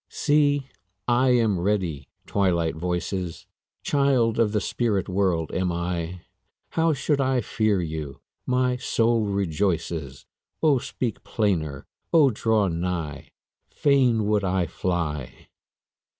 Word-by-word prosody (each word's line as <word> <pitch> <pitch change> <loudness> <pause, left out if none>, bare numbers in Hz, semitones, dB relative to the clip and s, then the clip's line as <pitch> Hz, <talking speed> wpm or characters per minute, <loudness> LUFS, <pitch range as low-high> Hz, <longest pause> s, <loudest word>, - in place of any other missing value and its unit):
See, 145 -2 +2 0.4
I 125 +2 +3
am 110 -6 +2
ready, 90 -7 -1 0.2
Twilight 85 -5 +1
voices! 90 +1 -3 0.4
Child 130 -6 +2
of 110 -3 +3
the 105 - +1
spirit 105 -4 -1
world 90 -4 0
am 90 -1 0
I; 85 0 -3 0.5
How 165 0 +2
should 145 0 0
I 130 -1 +1
fear 110 -7 0
you? 80 -4 -5 0.3
my 125 0 +1
soul 115 -3 +1
rejoices, 85 -7 -2 0.4
O 145 -5 +4
speak 125 -3 -4
plainer! 80 - -1 0.3
O 150 -5 +5
draw 110 -2 +1
nigh! 85 -4 -3 0.4
Fain 125 -6 +2
would 105 -1 +1
I 95 -1 +1
fly! 75 -7 -3
100 Hz, 115 wpm, -25 LUFS, 85-120 Hz, 0.5 s, O